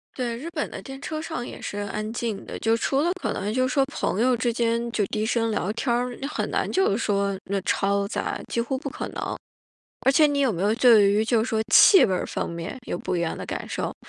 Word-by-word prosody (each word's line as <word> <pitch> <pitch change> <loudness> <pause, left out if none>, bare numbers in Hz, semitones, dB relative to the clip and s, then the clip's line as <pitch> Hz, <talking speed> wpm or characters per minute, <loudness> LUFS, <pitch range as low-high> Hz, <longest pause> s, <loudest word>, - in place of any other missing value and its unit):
对， 240 -3 -2
日 285 +8 -6
本 - - -3
的 - - -7
电 270 -1 -9
车 310 +1 -4
上 315 -7 -5
也 - - -9
是 205 - -5
安 215 +1 -4
静 225 -4 -3
的。 - - -6
就 225 0 +2
除 270 +4 0
了 340 +3 +1
可 - - -1
能 205 +2 -3
就 255 +1 +2
是 255 - -3
说 275 -1 +3
朋 270 -7 -2
友 255 +1 +4
之 240 0 0
间， 235 0 0
就 215 -3 0
低 215 0 -2
声 230 0 +1
聊 205 -2 -1
天 235 +2 -1
儿， 245 0 -2
你 275 - -3
很 - - -3
难 - - -1
就 380 - +2
是 200 - +1
说， 200 -3 0
那 200 0 -1
嘈 200 +1 0
杂， - - -3
几 - - 0
乎 255 +3 -1
不 280 +1 -5
可 - - -5
能。 - - -4 0.7
而 270 - +6
且 305 +2 +5
你 290 -1 0
有 270 -4 +3
没 175 -3 -4
有 205 +2 +2
对 230 -5 +6
于 210 +2 +2
就 230 -1 +2
是 240 - -4
说 220 -1 +1
气 390 - +8
味 190 - -1
儿 180 - -1
方 - - -3
面， 170 +6 -6
有 - - -3
不 180 - -3
一 170 - 0
样 170 - -1
的 - - -6
感 - - -5
受？ - - -3
230 Hz, 285 characters per minute, -25 LUFS, 205-260 Hz, 0.7 s, 气